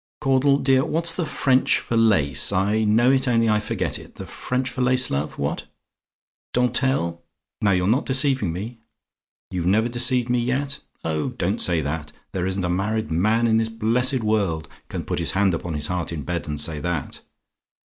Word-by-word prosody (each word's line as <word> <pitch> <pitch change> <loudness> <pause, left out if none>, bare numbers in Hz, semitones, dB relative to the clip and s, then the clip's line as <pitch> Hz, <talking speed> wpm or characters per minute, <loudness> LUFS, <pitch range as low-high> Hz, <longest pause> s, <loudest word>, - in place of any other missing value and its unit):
Caudle, 135 +1 +3
dear, 135 -1 +3
what's 165 +2 +3
the 170 -2 -2
French 130 -3 +2
for 120 - -3
lace? 80 - +2
I 100 +3 +1
know 115 +4 +4
it, 135 0 +2
only 115 -2 +3
I 105 -1 +3
forget 105 - -3
it. - - -14
The - - -8
French 125 0 -3
for 130 0 -4
lace, 125 0 +2
love? 70 +2 -2
What? - - -2 0.9
"DENTELLE? 125 -8 +1 0.4
"Now, 105 - +3
you're 90 0 +1
not 125 +8 +1
deceiving 130 - +1
me? 110 +7 -6 0.7
"YOU 90 -2 -2
NEVER 105 +6 +2
DECEIVED 120 0 +2
ME 125 0 +1
YET? 135 +4 -1 0.2
"Oh! 80 -2 -1
don't - - -2
say 85 -3 +2
that. 75 +1 -4 0.2
There 95 -1 -2
isn't 95 -1 -1
a - - 0
married 100 +4 -1
man 110 +8 +2
in 110 -1 +3
this 115 0 0
blessed 115 +3 0
world 100 -8 0 0.2
can - - -5
put - - -2
his - - +1
hand 95 -1 +2
upon 85 0 -3
his 75 0 -1
heart 90 0 -2
in 80 -4 -4
bed 85 +2 -3
and 75 -1 -3
say 75 0 -2
that. 85 -3 -3
110 Hz, 190 wpm, -23 LUFS, 90-125 Hz, 0.9 s, know